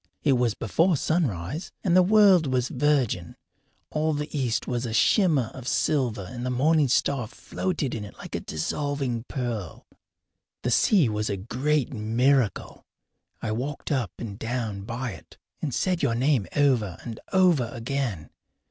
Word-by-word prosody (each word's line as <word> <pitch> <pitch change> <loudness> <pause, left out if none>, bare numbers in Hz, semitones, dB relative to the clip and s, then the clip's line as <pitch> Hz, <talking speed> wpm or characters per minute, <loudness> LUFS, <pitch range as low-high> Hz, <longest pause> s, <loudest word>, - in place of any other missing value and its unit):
It 145 - +4
was 120 -3 +1
before 165 - +2
sunrise, 145 - -1
and 175 -2 +2
the 185 - +8
world 190 -4 +5
was 125 -1 0
virgin. 130 - 0 0.6
All 155 +1 0
the 150 +1 -4
east 125 -5 0
was 120 -1 -2
a 110 - -4
shimmer 155 - +3
of 130 -2 -9
silver 125 -8 0
and 120 +2 -7
the 125 - -1
morning 145 +4 +3
star 125 -1 +1
floated 155 - -3
in 110 - -4
it 105 - -11
like - - -10
a - - -1
dissolving 130 - -2
pearl. 115 - -4 0.8
The 125 - 0
sea 175 - +4
was 105 -1 -1
a 100 - -1
great 135 +8 -1
miracle. 120 +2 +1 0.6
I 110 - -1
walked 135 +8 -4
up 125 - 0
and 105 -3 -7
down 115 -4 -3
by 120 +2 -4
it 95 - -13 0.2
and 150 - -2
said 180 +7 0
your 115 - +1
name 130 -3 +2
over 125 - +2
and 115 -2 -7
over 175 -11 +4
again. 120 - -3
125 Hz, 155 wpm, -26 LUFS, 115-150 Hz, 0.8 s, the